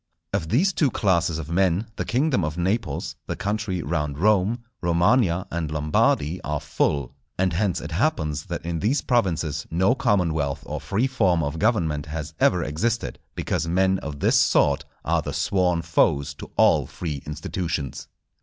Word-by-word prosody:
Of 80 - -1
these 180 - +3
two 150 -5 +2
classes 85 -7 +1
of 80 0 -6
men 95 +3 +2
the - - -3
kingdom 130 - +1
of 75 +2 -3
Naples, 100 +7 -1
the - - -2
country 100 -4 -2
round 75 -2 -2
Rome, 105 +5 +2 0.2
Romagna, 85 +2 +2
and 80 -2 -2
Lombardy 75 +2 +1
are 75 0 -2
full; 70 -2 -1 0.2
and 95 -2 +1
hence 95 +1 0
it 75 - -7
happens 80 - 0
that - - -5
in 85 -1 -2
these 120 - +1
provinces 85 - 0
no 95 +8 +3
commonwealth 85 - 0
or - - -5
free 110 +6 0
form 95 -11 +2
of 75 +3 -3
government 80 -10 +1
has 75 0 -5
ever 90 -2 +3
existed; 105 +11 -2 0.2
because 80 - -1
men 95 +2 +2
of 75 -6 -7
this - - +4
sort - - +3 0.2
are - - +2
the - - -5
sworn 90 -3 +1
foes 75 -4 +2
to - - -10
all - - +4
free 75 -6 -5
institutions. 80 -1 -4
85 Hz, 165 wpm, -24 LUFS, 75-100 Hz, 0.2 s, this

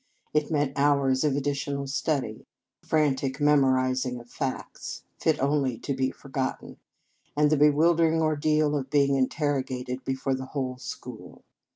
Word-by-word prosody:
It 150 -1 +1
meant 145 -3 0
hours 140 -2 +3
of 145 -3 +2
additional 140 0 -2
study, 135 -4 -2 0.4
a - - -25
frantic 140 -3 +1
memor 145 -3 +4
izing 130 -1 0
of 120 0 -15
facts, 130 - -5 0.2
fit 155 -2 +1
only 135 -3 +1
to 140 - -3
be 130 0 0
forgotten, 135 -1 -5 0.6
and 150 0 +4
the - - +5
bewildering 160 +3 +4
ordeal 155 -1 +2
of 135 -2 -3
being 140 -1 +3
interrogated 130 -2 -1
before 135 0 -1
the 130 0 -4
whole 130 -2 -2
school. 130 - -9
140 Hz, 145 wpm, -27 LUFS, 130-150 Hz, 0.6 s, the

